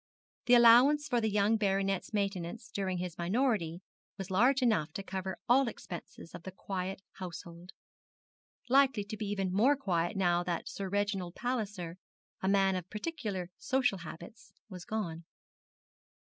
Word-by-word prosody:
The 245 - +7
allowance 250 +6 +7
for 245 -4 +1
the 220 - +1
young 210 +2 +3
baronet's 195 -2 0
maintenance 200 0 -3
during 190 -2 -2
his 175 -1 -5
minority 185 -3 0 0.3
was 195 -1 -6
large 255 +7 +4
enough 195 -10 +2
to 195 - -5
cover 190 0 -4
all 260 +2 +5
expenses 175 -5 -8
of 175 - -8
the 190 - -7
very 190 - -15
quiet 190 0 -4 0.2
household, 175 0 -8 1.0
likely 265 -4 +4
to 205 +2 -6
be 215 -1 -4
even 195 -2 -1
more 245 +9 +4
quiet 180 -7 -1
now 175 -2 +3
that 175 -2 -3
Sir 195 -1 -5
Reginald 200 -3 -1
Palliser, 205 -8 -3 0.4
a 190 - -1
man 195 -1 +3
of 185 -1 -5
particularly 210 - -4
social 260 -8 +1
habits, 170 +7 -10 0.2
was 180 -3 -9
gone. 170 -7 -3
195 Hz, 150 wpm, -32 LUFS, 180-225 Hz, 1.0 s, The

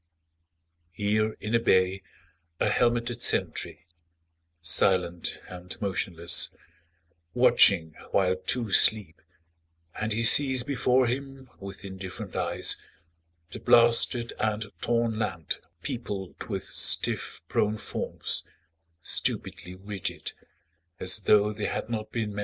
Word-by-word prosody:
Here 105 +4 0
in 110 - -5
a 115 - +4
bay, 95 -3 +2 0.6
a - - +2
helmeted 120 -1 0
sentry - - -1 0.7
Silent 85 +1 +1
and 90 0 -8
motionless, 90 -4 0 0.9
watching 100 -10 +4 0.2
while 95 -1 +2
two 105 +4 -2
sleep, 100 -8 +3 0.8
And 110 +1 -2
he 115 +2 0
sees 130 +1 +7
before 130 -1 +2
him 135 +1 -5
With 100 0 -9
indifferent 95 -1 -8
eyes - - 0 0.7
the - - -7
blasted 120 0 +4
and 110 -1 -2
torn 115 -2 0
land 85 -7 -3 0.3
Peopled 100 -6 -5
with - - -4
stiff - - -1
prone 105 +1 0
forms, - - -3 0.6
stupidly 90 +1 -1
rigid, 95 0 -5 0.7
As 95 +3 +1
tho' 105 +1 +3
they 105 0 -4
had 115 - -4
not 110 -2 -4
been 110 -3 -3
men. 100 - -5
105 Hz, 110 wpm, -27 LUFS, 95-115 Hz, 0.9 s, sees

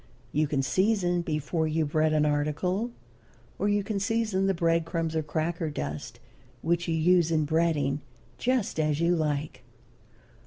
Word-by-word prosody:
You 150 +1 +1
can 140 -1 0
season 185 +1 +2
before 160 0 -1
you 155 0 +1
bread 155 +1 +1
an 155 -1 +3
article, 150 +9 0 0.7
or 205 - +1
you 205 0 +2
can 200 0 -2
season 205 -2 0
the 195 - +3
bread 165 0 +2
crumbs 165 -1 -2
or 160 - +2
cracker 160 +2 -2
dust 75 - -5 0.4
which 170 +1 0
you 165 - +1
use 170 +1 +4
in 155 -2 +2
breading, 150 -3 +1 0.4
just 240 -8 0
as 150 -1 +1
you 170 +1 +3
like. 150 -2 -2
165 Hz, 155 wpm, -28 LUFS, 150-180 Hz, 0.7 s, use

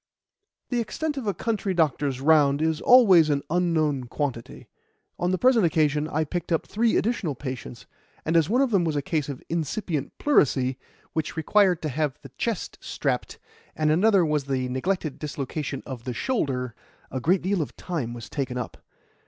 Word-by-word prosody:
The 245 - 0
extent 295 +7 -2
of 265 -6 -5
a 200 - +1
country 210 -4 -1
doctor's 145 -5 +1
round 145 -2 +4
is 160 0 0
always 195 -11 +7
an 140 -1 +1
unknown 160 -6 +1
quantity. 120 -2 -4 0.5
On 175 - +1
the 185 - +1
present 245 0 +4
occasion 150 -2 +2
I 155 0 0
picked 175 +4 -4
up 165 - +1
three 225 +2 +1
additional 205 - -1
patients, 130 -3 -7 0.4
and 160 - 0
as 165 -2 +4
one 250 +5 +3
of 265 - 0
them 195 -4 +3
was 160 -2 -1
a 145 - -1
case 155 -2 -1
of 140 - -6
incipient 160 -2 -3
pleurisy, 130 - +2 0.3
which 160 0 -3
required 185 +1 +3
to 155 - -1
have 145 0 -1
the 135 - -10
chest 230 -6 -3
strapped, - - -2 0.4
and 155 -1 +2
another 190 +2 +4
was 150 -3 -1
a 130 -1 0
neglected 155 +4 -2
dislocation 145 -1 -4
of 125 -4 -7
the 125 -2 -3
shoulder, 130 - -1 0.4
a 130 - -2
great 180 +7 +2
deal 190 -1 +1
of 150 - -5
time 155 -10 -4
was 115 -2 -8
taken 130 -3 -3
up. 125 - -5
155 Hz, 175 wpm, -25 LUFS, 140-185 Hz, 0.5 s, always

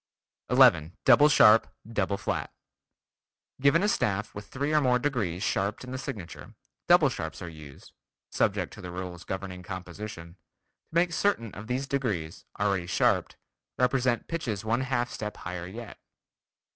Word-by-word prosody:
11. 80 +3 +5
Double 150 +1 +7
sharp, 110 -6 +6 0.2
Double 105 -3 -1
flat: - - -3 1.1
Given 140 +6 +4
a - - +3
staff 110 - 0
with 100 0 -8
three 140 +3 -2
or 150 - +4
more 125 -2 +3
degrees 110 -10 -1
sharped 100 +2 -1
in 125 - -8
the 130 - -4
signature, 105 - -8 0.3
double 175 -3 +6
sharps 80 - -5
are 90 - -6
used 75 -4 -12 0.4
(subject - - 0
to - - -10
the 90 - -7
rules 90 -1 -6
governing 95 -1 -5
composition) 90 -1 -8
to - - -48 0.6
make 170 0 +3
certain 115 - 0
of 100 +2 -9
these 130 +3 -1
degrees, 105 - -3
already 100 -4 0
sharped, 90 - +1 0.4
represent 125 -1 +1
pitches 115 -11 -3
one 115 +3 +1
half 125 -2 -1
step 105 -1 -5
higher 90 0 -6
yet. 115 +4 -9
105 Hz, 150 wpm, -28 LUFS, 90-130 Hz, 1.1 s, Double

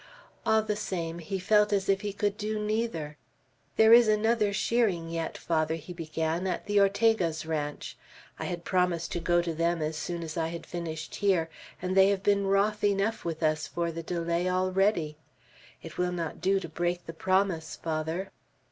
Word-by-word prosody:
All 220 0 +4
the 210 -1 -1
same, 170 -5 -3
he 190 +4 -4
felt 210 +3 +3
as 195 -1 +1
if 195 0 +2
he 205 -1 -3
could 205 0 -1
do 215 +1 -3
neither. 210 -8 -2 0.6
"There 220 +1 +7
is 235 -1 +8
another 215 0 +2
shearing 200 -6 +1
yet, 165 -1 -3
Father," 160 -1 0
he 165 +2 -8
began, 165 +1 -2
"at 180 - -2
the 205 0 +2
Ortega's 200 -5 +2
ranch. 150 -2 -3 0.4
I - - -3
had 175 -1 -4
promised 180 -2 0
to 175 - -2
go 175 0 +2
to 170 -1 -2
them 170 +1 0
as 155 +1 -2
soon 170 +2 -4
as 160 -1 -6
I 165 -1 0
had 165 0 -6
finished 160 -2 -5
here, 180 -5 +1 0.3
and 185 +1 -1
they 195 0 +7
have 200 -1 0
been 200 -1 +2
wroth 205 +2 +2
enough 205 +2 +1
with 165 -1 -4
us 155 0 +1
for 170 -1 -2
the 165 +1 -5
delay 170 +1 -1
already. 185 -3 +1 0.7
It - - -9
will 180 0 +1
not 170 -3 -4
do 195 +1 +2
to 175 - -6
break 175 +2 -2
the 165 - -7
promise, 185 -1 0
Father." 160 +4 -3
180 Hz, 185 wpm, -28 LUFS, 165-200 Hz, 0.7 s, is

